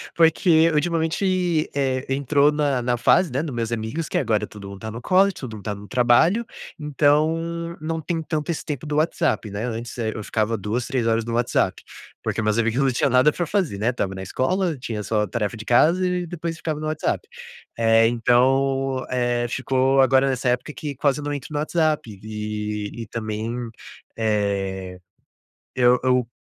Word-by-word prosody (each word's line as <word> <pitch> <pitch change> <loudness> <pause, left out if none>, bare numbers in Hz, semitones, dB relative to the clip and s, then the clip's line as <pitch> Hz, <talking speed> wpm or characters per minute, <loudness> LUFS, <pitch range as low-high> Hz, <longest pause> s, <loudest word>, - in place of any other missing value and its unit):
porque 165 0 +4
ultimamente, 170 +1 +1
eh, 135 -2 0
entrou 140 +2 +3
na 145 -4 0
na 120 0 0
fase, 170 +6 +3
né, 135 - 0
nos 150 -6 -5
meus 115 -1 -2
amigos 115 +8 -3
que - - 0
agora 110 -5 +1
todo 100 -2 -10
mundo 100 - -9
tá 110 - -5
no 115 +2 -7
college, 190 +6 +3
todo 125 -5 -7
mundo 105 - -10
tá 105 - -2
no 100 0 -11
trabalho, 130 - +3 0.3
então 160 +3 +1
não 160 +1 -3
tem 165 +1 -2
tanto 155 0 -3
esse 165 - -5
tempo 150 0 -4
do 150 0 -2
WhatsApp, 155 -8 0
né, 100 +2 -4
antes, 120 +1 -5
eh, 110 -2 -1
eu 110 - -4
ficava 110 +2 -1
2, 110 +5 -2
3 120 -3 -1
horas 115 0 +2
no 115 - -4
WhatsApp, 120 0 0 0.4
porque - - -1
meus 110 +1 +1
amigos 115 +3 +1
não 135 - +3
tinha 130 +2 +1
nada 130 +4 +5
pra 175 - -2
fazer, 180 - 0
né, 110 +3 +1
estava 100 -6 -2
na 95 - -6
escola, 170 - -1
tinha 115 -4 -4
só 105 0 0
tarefa 105 +1 -2
de 110 - -7
casa 165 +10 +4
e 180 -1 -1
depois 165 -1 -5
ficava 155 -3 -3
no 155 - -3
WhatsApp. 155 - -1 0.5
Eh, 115 0 +5
então, 130 +2 +2
eh, 120 -1 0
ficou 130 +1 +2
agora 130 +1 +4
nessa 130 -1 0
época 125 +5 -1
que 145 -2 -5
quase 145 +2 +1
não 145 0 -3
entro 140 0 -6
no 145 - -1
WhatsApp, 155 - 0
eh, 105 0 -4
e 115 - -7
também, 110 +1 -4 0.6
eh, 100 -4 -1 0.8
eu 125 0 +4
eu 125 -2 +2
130 Hz, 185 wpm, -23 LUFS, 115-155 Hz, 0.8 s, nada